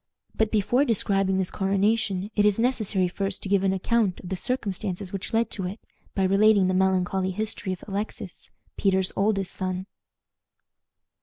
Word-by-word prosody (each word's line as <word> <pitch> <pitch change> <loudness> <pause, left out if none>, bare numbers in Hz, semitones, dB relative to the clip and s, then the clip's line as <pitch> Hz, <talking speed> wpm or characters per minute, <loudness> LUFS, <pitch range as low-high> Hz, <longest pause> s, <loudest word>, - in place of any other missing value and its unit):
But 220 -1 +1
before 225 +5 +2
describing 195 -6 +2
this 190 -2 0
coronation 200 0 0
it 205 - +3
is 210 -1 +3
necessary 220 -6 +1
first 195 +2 -3
to 195 - -4
give 195 -1 +3
an 195 - +3
account 195 0 +1
of 180 - -9
the 190 - -1
circumstances 195 -4 -3
which 195 - -5
led 230 +1 +1
to 190 -4 -3
it, 200 +4 -7 0.4
by 195 - +1
relating 200 +1 +4
the 185 - +1
melancholy 190 0 +1
history 205 0 -2
of 185 - -6
Alexis, 205 +1 -5 0.3
Peter's 190 -2 +1
oldest 195 -2 +1
son. 185 0 -3
195 Hz, 160 wpm, -25 LUFS, 190-215 Hz, 0.4 s, relating